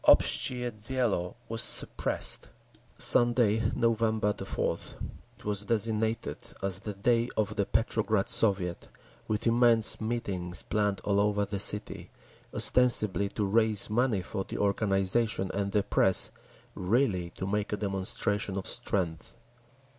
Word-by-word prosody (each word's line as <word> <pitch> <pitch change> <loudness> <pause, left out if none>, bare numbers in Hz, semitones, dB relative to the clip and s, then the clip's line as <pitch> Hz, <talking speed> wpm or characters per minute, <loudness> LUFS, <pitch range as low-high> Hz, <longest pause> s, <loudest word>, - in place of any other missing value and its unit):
Obshtchee 125 -1 +3
Dielo 110 -5 -2
was 115 +1 -2
suppressed…. - - +1 0.5
Sunday, 120 -3 +3
November 110 -3 +1
4th, - - -4 0.5
was 105 -1 -1
designated 110 +1 -1 0.3
as 95 -1 +1
the 105 +1 -7
Day 115 +4 +1
of 110 -2 -1
the 100 - -1
Petrograd 110 -2 0
Soviet, 95 -5 +2 0.4
with 105 -1 -2
immense 115 -2 +3
meetings 95 -7 -3
planned 105 -2 -1
all 100 0 +1
over 105 0 +1
the 100 0 -5
city, 105 +1 +2 0.4
ostensibly 110 -5 +3
to 105 - -3
raise 110 0 +1
money 115 -4 0
for 95 +1 -4
the - - -7
organisation 100 0 0
and 100 0 -2
the 105 -1 +1
press; 95 -1 +5 0.4
really, 95 -3 0
to 95 - -4
make 105 +1 -2
a 105 - -2
demonstration 100 0 -2
of 95 - -4
strength. 85 +1 -3
105 Hz, 125 wpm, -28 LUFS, 100-115 Hz, 0.5 s, press